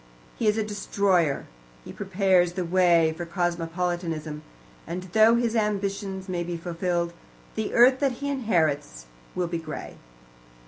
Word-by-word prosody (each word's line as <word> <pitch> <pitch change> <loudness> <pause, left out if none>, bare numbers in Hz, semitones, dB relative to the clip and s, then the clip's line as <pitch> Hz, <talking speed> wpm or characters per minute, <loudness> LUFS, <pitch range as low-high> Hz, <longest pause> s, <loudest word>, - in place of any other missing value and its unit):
He 225 - -1
is 210 +1 +3
a 220 - +1
destroyer. 200 -6 +1 0.4
He - - -8
prepares 185 -3 +2
the 180 -1 -2
way 170 -2 +4
for 175 - -5
cosmopolitanism, 170 -2 -2 0.5
and 175 +3 -4
though 220 +1 +6
his 235 -1 0
ambitions 200 -2 -1
may 180 -2 -2
be 175 0 -4
fulfilled, 170 0 -2 0.4
the 220 -1 -3
earth 255 +2 +6
that 275 -3 +1
he 280 +4 -5
inherits 160 - 0 0.3
will 180 - 0
be 170 0 -3
grey. 155 -2 -7
180 Hz, 140 wpm, -26 LUFS, 170-205 Hz, 0.5 s, though